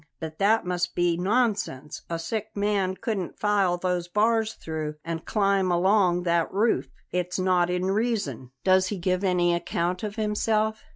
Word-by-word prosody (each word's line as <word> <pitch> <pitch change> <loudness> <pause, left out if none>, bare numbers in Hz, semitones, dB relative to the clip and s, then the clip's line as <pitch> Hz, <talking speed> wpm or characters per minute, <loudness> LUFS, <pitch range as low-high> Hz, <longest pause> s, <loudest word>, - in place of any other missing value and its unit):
But 160 -1 -7
that 210 +2 +3
must 180 0 -2
be 175 -1 +2
nonsense; 195 - -1
a 165 - -2
sick 215 +6 -3
man 200 -2 +1
couldn't 195 -4 -3
file 200 -4 +2
those 180 -1 -1
bars 220 +3 +1
through 155 -1 -5
and 165 -1 -4
climb 195 -3 +2
along 180 0 +3
that 170 -1 +1
roof. 215 +4 +1 0.2
It's 180 0 -2
not 180 -2 +2
in 180 +1 -1
reason." 200 - -1
"Does 185 0 +4
he 205 - -3
give 185 +1 0
any 175 -2 +2
account 170 +1 -1
of 210 -1 -4
himself?" 215 0 0
185 Hz, 160 wpm, -26 LUFS, 175-210 Hz, 0.2 s, Does